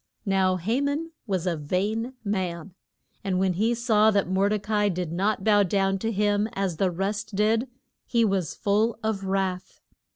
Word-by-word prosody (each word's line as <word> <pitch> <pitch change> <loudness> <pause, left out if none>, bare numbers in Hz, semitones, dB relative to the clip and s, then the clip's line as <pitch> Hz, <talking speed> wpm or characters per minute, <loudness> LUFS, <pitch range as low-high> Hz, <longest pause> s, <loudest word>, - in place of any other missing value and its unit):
Now 190 -2 +2
Ha 220 +10 0
man 290 +4 -2 0.2
was 190 -3 -1
a 175 -2 0
vain 205 - -2
man, 185 -4 -3 0.5
and 190 -2 0
when 190 0 +2
he 220 +6 +1
saw 220 -2 +3
that 200 -4 +1
Mor 190 +2 +2
de 215 - +1
ca 210 +2 -6
i 210 -1 +3
did 180 -3 -3
not 195 +3 0
bow 205 -1 +5
to 195 +2 0
him 205 +1 +1
as 195 -4 -2
the 190 +1 +2
rest 200 +4 -3
did 220 +4 +2 0.4
he 235 -2 +2
was 190 -6 -1
full 215 +3 +1
of 215 -3 -2
wrath. 190 -1 -2
200 Hz, 175 wpm, -26 LUFS, 185-215 Hz, 0.5 s, bow